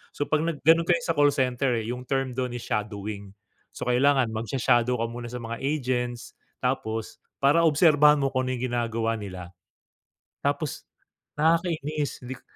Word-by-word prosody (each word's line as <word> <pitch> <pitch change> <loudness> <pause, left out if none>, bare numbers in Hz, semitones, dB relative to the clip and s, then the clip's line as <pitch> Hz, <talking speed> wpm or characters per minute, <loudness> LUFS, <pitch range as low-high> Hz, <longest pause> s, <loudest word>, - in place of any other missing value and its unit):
So, - - -1
'pag 155 - +2
nag 165 -3 -2
gano'n 165 +2 +5
kayo 175 -1 +3
sa - - 0
call 145 0 +5
center, 125 -1 +1
eh, 110 -1 -3
yung 125 +1 -7
term 135 -1 0
do'n 125 -1 -3
is 120 - -6
shadowing. 105 -1 -4 0.4
So, - - -5
kailangan 130 -1 +3
magsha-shadow 120 +2 +1
ka - - +1
muna 120 0 -6
sa 125 +1 -6
mga 115 0 -5
agents. 130 -3 -2 0.3
Tapos 115 -4 -2 0.2
para 145 +5 +5
obserbahan 150 -1 +5
mo 135 -1 0
kung 130 -1 -1
ano 130 - -1
yung 125 +1 -3
ginagawa 115 -1 -1
nila. 90 -4 -8 0.9
Tapos - - -2 0.5
nakakainis, 155 -2 0
hindi 130 +1 -6
k - - -28
125 Hz, 165 wpm, -26 LUFS, 115-145 Hz, 0.9 s, gano'n